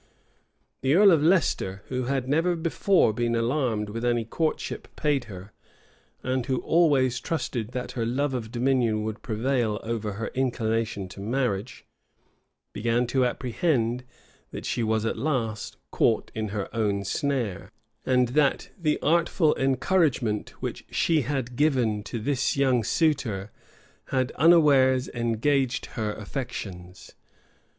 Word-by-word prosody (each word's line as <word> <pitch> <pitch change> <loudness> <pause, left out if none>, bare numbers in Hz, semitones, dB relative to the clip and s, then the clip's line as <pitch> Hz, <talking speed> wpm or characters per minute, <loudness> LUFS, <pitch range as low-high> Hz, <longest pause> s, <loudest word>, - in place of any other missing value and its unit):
The 135 +3 +2
earl 200 +1 +7
of 160 -4 +4
Leicester, 150 - +1
who 125 -1 -2
had 135 0 -1
never 165 +5 +2
before 165 - +2
been 120 +1 0
alarmed 115 -3 0
with 115 +3 -5
any 120 -1 +1
courtship 155 +7 -2
paid 145 -4 0
her, 100 -2 -10 0.7
and 130 0 0
who 130 -2 0
always 140 -7 +3
trusted 130 -8 -3
that 125 -1 -4
her 120 - -3
love 135 +4 0
of 115 -3 -4
dominion 120 -3 +1
would 110 0 -5
prevail 115 -1 -1
over 110 -2 -3
her 110 +3 -4
inclination 115 -5 -1
to 95 - -11
marriage, 115 0 -2 0.9
began 115 +3 +1
to 130 +2 +1
apprehend 125 -1 0 0.5
that - - -7
she - - -1
was 110 -1 0
at 115 - -2
last 115 -6 -2
caught - - +1
in 110 -1 -3
her 100 -1 -3
own 100 -3 0
snare, 120 - -2 0.3
and 125 -2 +2
that 140 +1 +1
the 155 -6 0
artful 165 0 +3
encouragement 135 - +1
which - - -4
she 160 -3 +2
had 130 -2 -3
given 125 -7 +2
to 115 - -4
this 135 +4 0
young 130 -4 +3
suitor 115 - 0 0.5
had 130 -1 -1
unawares 140 -6 +4
engaged 120 +3 0
her 110 -2 -2
affections. 100 -6 -7
125 Hz, 135 wpm, -26 LUFS, 110-140 Hz, 0.9 s, earl